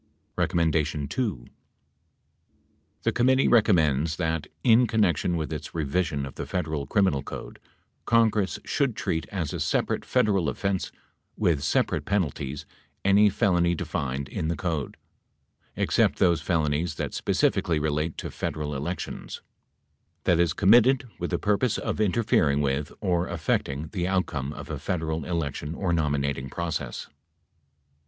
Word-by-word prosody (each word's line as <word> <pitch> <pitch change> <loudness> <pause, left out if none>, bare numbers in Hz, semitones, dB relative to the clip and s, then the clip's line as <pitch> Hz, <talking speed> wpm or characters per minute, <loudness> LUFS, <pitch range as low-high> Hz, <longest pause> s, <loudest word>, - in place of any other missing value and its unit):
2. 80 - 0 1.6
The - - +2
committee 130 +2 +3
recommends 80 - +3
that, 80 -3 -2 0.2
in 120 0 +5
connection 90 -6 +1
with 80 0 -3
its 75 0 -6
revi 80 +3 +1
sion 70 -5 -3
of 65 - -8
the - - -6
Federal 80 -6 -2
Criminal 95 -6 +2
Code, - - -8 0.5
Congress 110 -7 +2
should - - 0
treat 80 -4 -2
as 85 -7 -3
a - - -3
separate - - 0
Federal 105 -10 +2
offense, 95 +7 -2 0.5
with 80 -5 +2
separate - - 0
penalties, 75 -7 -2 0.4
any 100 +2 +6
felony 85 -3 +2
defined 70 -3 -3
in 80 - -3
the 85 - 0
code 80 -3 -3 0.8
(except - - +2
those 85 -3 +3
felonies 80 0 0
that - - -4
specifically 80 -3 +1
relate 75 +1 -1
to - - -5
Federal 75 -1 -3
elections) 75 +6 -5 0.8
that 85 - +3
is 85 -2 +3
committed 120 +5 +5
with - - -2
the - - 0
purpose 105 +3 +1
of - - -2
interfering 90 -8 +2
with 70 0 -1
or 90 -3 +1
affecting 80 -3 -1
the 90 -3 -2
outcome 85 -8 -1
of - - -8
a - - -4
Federal 80 -3 -2
election 80 -2 -3
or 90 -1 -1
nominating 70 -4 0
process. 75 -5 -4
80 Hz, 135 wpm, -26 LUFS, 75-95 Hz, 1.6 s, any